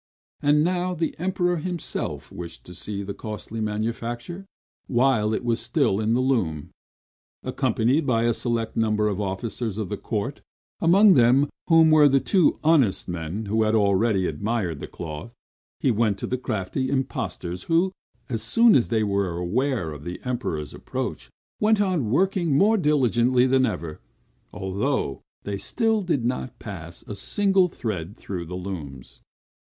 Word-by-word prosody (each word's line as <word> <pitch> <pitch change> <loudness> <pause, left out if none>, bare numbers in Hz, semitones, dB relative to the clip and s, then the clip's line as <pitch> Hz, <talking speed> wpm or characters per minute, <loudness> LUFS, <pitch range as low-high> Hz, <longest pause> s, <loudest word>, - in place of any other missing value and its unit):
And 150 +1 +4
now 180 +1 0
the 165 -1 -1
Emperor 180 0 0
himself 175 +1 -4
wished 85 -1 -8
to 90 - -11
see 100 +3 -4
the 100 0 -5
costly 110 +1 -6
manufacture, 115 - -3 0.4
while 120 -4 +2
it 110 - -2
was 115 -1 +1
still 95 - +1
in 110 +2 +1
the - - +2
loom. 95 - 0 0.7
Accompanied 135 +7 +1
by 115 -3 +2
a 120 0 +3
select 115 -1 -2
number 105 -1 +1
of 105 -1 -1
officers 105 +2 -3
of 110 -4 -3
the 105 - -3
court, 115 +8 -3 0.4
among 155 - +5 0.2
whom 165 -2 +6
were 150 -2 +7
the 135 0 +4
two 180 +2 +3
honest 150 - +3
men 85 +5 -4
who 110 +2 +1
had 110 0 +2
already 100 -1 +2
admired 90 -1 -2
the - - -6
cloth, 85 +8 -8 0.4
he 130 - +2
went 110 -3 +1
to - - -4
the 130 - -1
crafty 125 +1 -2
impostors, 95 -9 -3
who, 170 +3 +2 0.4
as 115 -4 -2
soon 230 - +5
as 125 - +4
they 110 -2 +1
were 100 -4 0
aware 105 - -1
of 75 -1 -9
the 90 +2 -6
Emperor's 115 - -3
approach, - - -5 0.3
went 215 0 +3
on 180 - +1
working 175 - +2
more 210 +7 +5
diligently 130 - +3
than 130 0 +3
ever; 85 -8 -5 0.5
although 95 - -2 0.2
they 100 -1 -3
still 225 - 0
did 165 -10 -1
not 125 +1 -3
pass 85 -5 -8
a - - -7
single 190 - +2
thread 105 - -5
through 90 -3 -5
the 90 +2 -5
looms. 80 -9 -8
115 Hz, 155 wpm, -24 LUFS, 100-145 Hz, 0.7 s, were